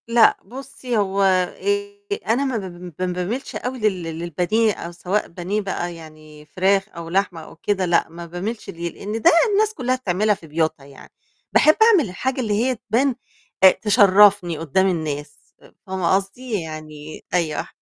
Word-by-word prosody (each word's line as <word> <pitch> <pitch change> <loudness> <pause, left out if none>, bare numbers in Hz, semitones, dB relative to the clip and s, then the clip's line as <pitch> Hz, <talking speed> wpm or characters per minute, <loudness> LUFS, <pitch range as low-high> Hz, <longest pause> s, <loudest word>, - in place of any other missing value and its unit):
لأ، 230 0 +5
بُصّي 255 +1 -5
هو 200 -1 0
آآ 405 - 0 0.3
أنا 240 +6 +2
ما 260 -4 -1
ب - - -3
ما 175 -2 -9 0.2
ب - - -6
ما - - +2
باميلش 185 +9 -4
أوي 255 +1 -4
لل 200 -5 0
للبانيه، 175 +7 0
أو 170 - -7
سواء 180 +4 -2
بانيه 185 +5 -3
بقى 175 -3 -4
يعني 155 -2 -14
فراخ 195 +5 +1
أو 170 -3 -9
لحمة 180 -2 0
أو - - -13
كده، 190 +3 -1
لأ، 170 -2 +2
ما 170 +1 -9
باميلش 190 +7 -5
ليه، 170 +1 -4
لأن 215 +3 -5
ده - - +6 0.2
الناس 430 +1 +2
كلّها 255 - -1
بتعملها 210 -3 +1
في 165 - -15
بيوتنا 155 -2 -1
يعني، 140 -1 -15 0.4
باحب 310 - +6
أعمل 405 - +5
الحاجة 260 +8 -2
اللي 215 -4 -1
هي 245 +5 +1
تبان 240 +5 0 0.5
أ 190 - +10
تشرفني 200 -4 +4
قدّام 165 +5 +1
الناس، 150 -4 -3 0.5
فاهمة 190 -1 +1
قصدي؟ 205 +2 -3
يعني 155 -1 -9
أيوه، 165 -4 0
190 Hz, 170 wpm, -21 LUFS, 170-225 Hz, 0.5 s, أ